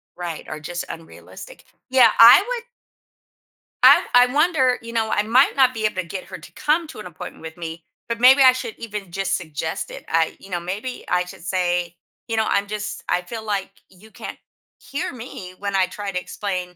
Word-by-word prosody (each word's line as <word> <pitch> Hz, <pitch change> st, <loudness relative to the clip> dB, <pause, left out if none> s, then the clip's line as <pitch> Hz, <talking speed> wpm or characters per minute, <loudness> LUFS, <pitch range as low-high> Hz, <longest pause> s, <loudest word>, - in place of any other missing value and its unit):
Right, 175 Hz, -3 st, -6 dB
or 155 Hz, -, -6 dB
just 175 Hz, +3 st, -5 dB
unrealistic. 165 Hz, -, -11 dB, 0.3 s
Yeah, 260 Hz, 0 st, +6 dB
I 230 Hz, +1 st, +10 dB
w 445 Hz, +6 st, -5 dB, 1.3 s
I -, -, +8 dB
I 245 Hz, 0 st, +7 dB
wonder, 285 Hz, -5 st, +3 dB
you 230 Hz, 0 st, -9 dB
know, 225 Hz, -1 st, 0 dB
I 205 Hz, -, +1 dB
might 250 Hz, +7 st, +3 dB
not 260 Hz, -2 st, +4 dB
be 220 Hz, -2 st, -2 dB
able 215 Hz, -, 0 dB
to 185 Hz, -, -2 dB
get 180 Hz, +2 st, -7 dB
her -, -, -9 dB
to -, -, -14 dB
come 320 Hz, +2 st, 0 dB
to 315 Hz, -, -11 dB
an 210 Hz, -, -8 dB
appointment 175 Hz, -3 st, -9 dB
with 160 Hz, +1 st, -9 dB
me, 165 Hz, -1 st, -7 dB, 0.3 s
but 230 Hz, 0 st, -2 dB
maybe 260 Hz, +3 st, +7 dB
I 260 Hz, -, +9 dB
should 250 Hz, -3 st, -5 dB
even 210 Hz, -5 st, -7 dB
just 195 Hz, +1 st, -1 dB
suggest 160 Hz, -2 st, -5 dB
it. -, -, -10 dB
I 165 Hz, 0 st, +1 dB
you 195 Hz, -, -14 dB
know, 175 Hz, -2 st, -2 dB
maybe 200 Hz, +9 st, -6 dB
I 180 Hz, 0 st, +1 dB
should 175 Hz, -, -12 dB
say, 175 Hz, -2 st, -1 dB, 0.3 s
you 230 Hz, -, -2 dB
know 220 Hz, 0 st, +1 dB
I'm 200 Hz, 0 st, +1 dB
just 210 Hz, 0 st, -5 dB
I 180 Hz, -, +2 dB
feel 220 Hz, +5 st, -8 dB
like 200 Hz, -2 st, -2 dB, 0.2 s
you 200 Hz, +4 st, -19 dB
can't -, -, -8 dB, 0.4 s
hear 320 Hz, +3 st, -5 dB
me 215 Hz, -7 st, -9 dB
when 200 Hz, -1 st, -3 dB
I 190 Hz, -, +4 dB
try 205 Hz, 0 st, -6 dB
to 180 Hz, -, -2 dB
explain 180 Hz, -2 st, -5 dB
200 Hz, 210 wpm, -22 LUFS, 180-245 Hz, 1.3 s, I